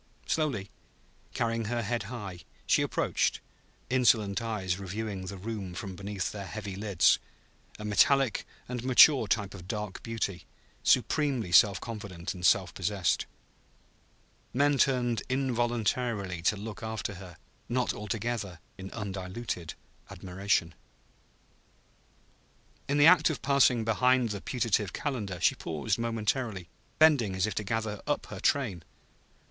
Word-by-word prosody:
Slowly, 135 -11 -1 0.6
carrying 115 -1 0
her 120 +2 -1
head 120 +3 -1
high, 100 -8 -6 0.3
she - - +3
approached, - - 0 0.5
insolent 115 -5 +3
eyes 100 -5 -2
reviewing 100 0 -5
the 100 +1 -6
room 100 -3 -5
from 95 0 -6
beneath 100 0 -4
their 100 -2 -6
heavy 105 -2 -6
lids; 100 -3 +3 0.6
a 105 - -7
metallic 130 +3 +3 0.2
and 125 -1 -4
mature 130 -1 +7
type 100 -1 0
of 90 -2 -10
dark 105 -3 -4
beauty, 110 -5 -4 0.3
supremely 135 - +2
self 100 +1 +6
confident 100 -7 -6
and 90 -2 -10
self 95 -2 +3
possessed. 95 -2 0 1.3
Men 145 +1 +3
turned 120 -4 +2
involuntarily 120 -6 -1
to 105 - +3
look 105 +1 -7
after 110 -2 -4
her, 90 -3 -11 0.3
not 125 +1 0
altogether 105 -3 -3 0.2
in 95 0 -7
undiluted 95 -3 -5 0.3
admiration. 90 -2 -1 2.2
In 140 - +2
the 145 - +6
act 180 +1 +7
of 155 - -4
passing 130 -5 +4
behind 125 +2 +3
the 100 -2 -4
putative 110 -5 0
Calendar, 110 - -3
she - - +4
paused 90 +7 -2
momentarily, 115 -4 -2 0.3
bending 140 -11 +4
as 95 +1 +1
if 110 - -2
to 105 - -2
gather 110 0 -2
up - - 0
her - - -6
train. 115 - +1
110 Hz, 130 wpm, -29 LUFS, 95-120 Hz, 2.2 s, mature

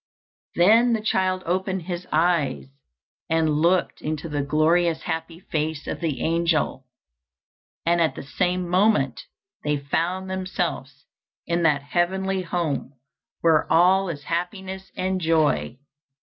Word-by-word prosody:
Then 225 +7 +5
the 225 - +1
child 185 -3 0
opened 185 +1 -1
his 175 +1 -5
eyes 155 - +1 0.6
and 160 -2 +2
looked 175 +2 +2
into 155 +1 -3
the 145 -1 -1
glorious 160 +3 +2
happy 165 +1 -4
face 155 -3 -3
of - - -4
the 155 -7 -2
angel, 165 -5 0 1.0
and 170 +1 +3
at 160 - +1
the - - -7
same 180 +5 -1
moment 210 - +2 0.4
they 150 0 +1
found 170 +7 -2
themselves 180 -7 -4 0.4
in 170 0 0
that 150 -4 +2
heavenly 190 +5 0
home 165 -6 -2 0.5
where 165 -2 +3
all 185 +3 +4
is 145 -3 -6
happiness 190 +4 -4
and 185 0 -1
joy. 155 - +1
170 Hz, 125 wpm, -24 LUFS, 155-185 Hz, 1.0 s, Then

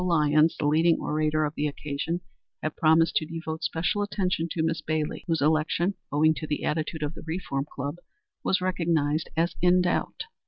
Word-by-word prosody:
Lyons, 155 -2 +3
the 150 - -2
leading 160 +3 +4
orator 155 0 +1
of 150 - -3
the 150 -1 -1
occasion, 150 +4 -3 0.4
had 155 - -2
promised 160 +1 +4
to 155 - 0
devote 160 -1 -5
special 175 +6 0
attention 185 -5 -1
to 160 0 -1
Miss 160 -1 0
Bailey, 155 0 -2
whose 165 -3 +1
election, 160 +5 +2 0.2
owing 155 +2 +4
to 155 - -5
the 150 - -2
attitude 155 0 -2
of 150 +1 -2
the - - -10
Reform 150 -5 -3
Club, 140 +4 -4 0.5
was 190 - +1
recognized 165 -4 0
as 170 +2 +2
in 180 +1 +5
doubt. 175 - -1
160 Hz, 180 wpm, -27 LUFS, 150-170 Hz, 0.5 s, in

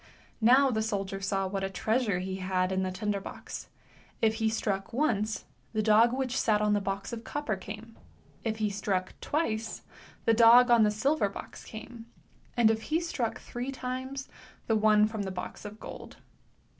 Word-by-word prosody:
Now 260 +4 +6
the 220 -2 0
soldier 195 -3 -2
saw 195 0 0
what 195 +1 -2
a 195 - -1
treasure 220 +1 0
he 190 +1 -3
had 185 0 0
in 190 0 +1
the 185 - 0
tinder 205 +1 -1
box. - - -8 0.5
If 220 -1 +3
he 220 - +3
struck 195 -3 -2
once, 225 -5 0 0.3
the 215 -1 +1
dog 220 +2 +6
which 260 0 -1
sat 210 -2 +3
on 210 0 +2
the 205 - +2
box 195 +2 -3
of 230 -1 -5
copper 290 -7 -2
came; 210 +4 -9 0.5
if 220 -1 -1
he 215 -2 0
struck 195 -2 -1
twice, 225 -8 -2 0.4
the 230 - +5
dog 240 +2 +7
on 235 -1 +7
the 210 - +5
silver 215 +2 +1
box - - -9
came, 230 +1 -9 0.5
and 225 -2 +6
if 220 0 -1
he 315 +2 +3
struck 275 -9 -2
three 245 +3 -5
times, 260 +1 -4 0.4
the 225 - +2
one 215 0 +5
from 215 -1 -3
the 195 - -3
box 185 +3 -6
of 210 +1 -8
gold. - - -9
220 Hz, 180 wpm, -29 LUFS, 200-240 Hz, 0.5 s, dog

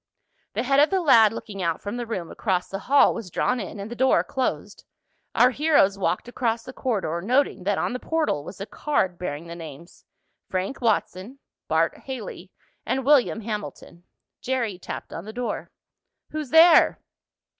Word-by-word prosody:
The - - -1
head 275 +2 +3
of 295 - +5
the 385 - +1
lad 235 - +6
looking 205 -3 -7
out 165 -2 -1
from 205 +4 -5
the 240 -1 -4
room 180 -7 -4
across 185 -4 -1
the 195 - -5
hall 280 +6 +4
was 200 - -7
drawn 250 +8 0
in, 200 0 -6
and 200 +3 -7
the - - -5
door 260 +2 +3
closed. 260 -1 -3 0.5
Our 245 +2 +5
heroes 285 -9 +3
walked 195 +2 -1
across 235 -2 -1
the 260 - -10
corridor, 190 -12 -2
noting 240 -2 +1
that 205 0 +1
on - - -1
the 250 - -3
portal 315 - -1
was 180 +5 -10
a 200 - -4
card 190 - -1
bearing 155 -2 -5
the 170 0 -8
names 165 0 -11 0.5
Frank 190 +9 -3
Watson, 220 +1 -1 0.3
Bart 160 +1 +1
Haley 220 -8 -7 0.3
and 265 -1 -2
William 270 -6 +4
Hamilton. 210 -5 -7 0.4
Jerry 235 -7 -2
tapped - - -7
on 170 - -7
the 215 - -8
door. 245 0 -4 0.6
"Who's 305 -3 -4
there?" 325 +3 +6
225 Hz, 175 wpm, -24 LUFS, 185-260 Hz, 0.6 s, lad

